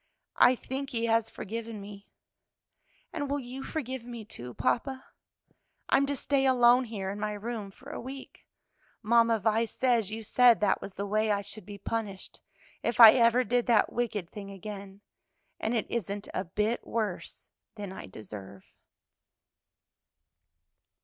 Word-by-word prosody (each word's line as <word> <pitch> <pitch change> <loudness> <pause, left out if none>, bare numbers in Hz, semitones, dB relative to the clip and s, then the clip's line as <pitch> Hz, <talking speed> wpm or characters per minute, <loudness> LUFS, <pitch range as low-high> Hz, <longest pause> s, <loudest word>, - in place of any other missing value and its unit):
"I 255 - +7
think 270 +3 -5
He 230 -1 -1
has 225 -1 +2
forgiven 225 +1 -6
me, 200 0 -10 1.1
and 285 -4 -3
will 285 +1 0
you 255 +1 -7
forgive 260 -6 -4
me, 235 -2 -8
too, 125 - -9
papa? 265 +2 -1 0.8
I'm 275 - +4
to 285 - -1
stay 270 0 +1
alone 250 0 +5
here 200 -4 -4
in 205 - -6
my 210 0 -2
room 210 -1 -5
for 195 - -12
a - - -5
week. 265 +2 -10 0.6
Mamma 230 +1 +4
Vi 220 +2 +2
says 235 -2 +1
you 220 +1 -5
said 240 +1 +5
that 205 -2 +2
was 195 - -8
the 200 - -3
way 215 +2 +1
I 200 -1 +2
should 205 0 -10
be 205 -1 -8
punished, 205 -3 -4 0.4
if 235 - -2
I 225 -2 +13
ever 240 0 +4
did 245 +1 0
that 235 -3 +3
wicked 215 -7 -2
thing 200 -1 -8
again, 200 0 -8 0.6
and 225 +2 -1
it 225 - 0
isn't 205 -3 -3
a 185 - -2
bit 210 +6 -1
worse 215 -6 -4 0.2
than 205 -3 -6
I - - -8
deserve." 100 -1 -10
225 Hz, 155 wpm, -29 LUFS, 200-245 Hz, 1.1 s, I